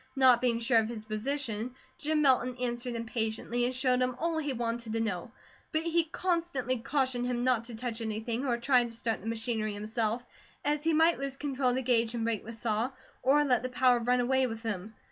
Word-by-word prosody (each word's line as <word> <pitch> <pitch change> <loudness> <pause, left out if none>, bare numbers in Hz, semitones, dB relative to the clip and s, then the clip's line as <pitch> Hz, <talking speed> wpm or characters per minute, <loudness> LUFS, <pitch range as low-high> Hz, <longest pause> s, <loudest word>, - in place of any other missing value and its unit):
Not 255 -3 +6
being 240 -2 +2
sure 230 0 +4
of 220 0 -1
his 220 -2 -6
position, 230 +1 -3 0.2
Jim 305 0 +1
Milton 255 -2 +3
answered 240 0 -2
him 230 0 -3
patiently, 225 +1 -1
and 255 +1 -1
showed 255 -1 +2
him 255 -1 +1
all 325 +2 0
he 295 -2 -1
wanted 235 -2 -3
to 225 - 0
know; 215 -2 -2 0.4
but 315 0 0
he 335 0 +2
constantly 330 -7 -1
cautioned 255 -1 0
him 245 -1 -1
not 250 -3 +2
to 235 -1 -7
touch 235 0 -4
anything, 225 +3 -2
or 245 -4 +1
try 250 +1 +4
to 235 - -5
start 230 0 -2
the - - -8
machinery 225 -2 -2
himself, 220 +3 -2 0.4
as 295 0 +1
he 325 - +3
might 325 0 +4
lose 275 -1 -4
control 275 -3 0
of 245 - +1
the 260 - -1
gauge 235 -2 +2
and 230 - -1
break 225 -3 -1
the 230 - -7
saw, 225 +1 -1 0.3
or 295 +3 +4
let 255 -3 +3
the 255 - -3
power 250 -1 +4
run 245 +2 +2
away 260 +1 +2
with 225 -1 -6
him. 215 -1 -4
245 Hz, 220 wpm, -30 LUFS, 225-265 Hz, 0.4 s, Not